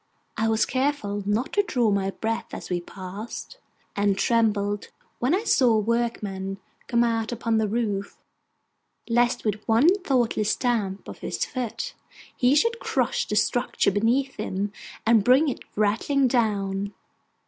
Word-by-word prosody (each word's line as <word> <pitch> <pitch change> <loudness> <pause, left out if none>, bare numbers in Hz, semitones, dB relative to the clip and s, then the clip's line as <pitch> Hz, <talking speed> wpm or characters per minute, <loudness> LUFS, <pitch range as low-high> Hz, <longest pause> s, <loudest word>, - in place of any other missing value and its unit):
I 220 - 0
was 220 -1 +2
careful 260 -7 -1
not 225 +8 0
to 410 - +4
draw 245 - +1
my 195 -1 +1
breath 225 +3 -3
as - - -8
we 175 -1 0
passed, 200 - -8 0.4
and 200 -1 +2
trembled 205 -2 +1 0.3
when 260 +8 +2
I 405 - -1
saw 250 - +4
a - - +3
workman 210 -4 -2 0.3
come 235 0 +3
out 225 -1 0
upon 230 -1 0
the 220 - +1
roof, 205 -3 -2 0.9
lest 240 +1 +2
with 210 -1 -1
one 245 +11 +5
thoughtless 240 - +1
stamp 215 -6 -1
of - - -9
his - - -2
foot 255 - -4 0.4
he 255 +2 +3
should 465 +9 +2
crush - - 0
the - - -2
structure - - +2
beneath 240 +7 +1
him, 195 +2 -2 0.3
and 225 -2 +5
bring 260 +7 +5
it 260 - -4 0.2
rattling 225 +7 +2
down. 200 -4 0
225 Hz, 150 wpm, -25 LUFS, 205-250 Hz, 0.9 s, one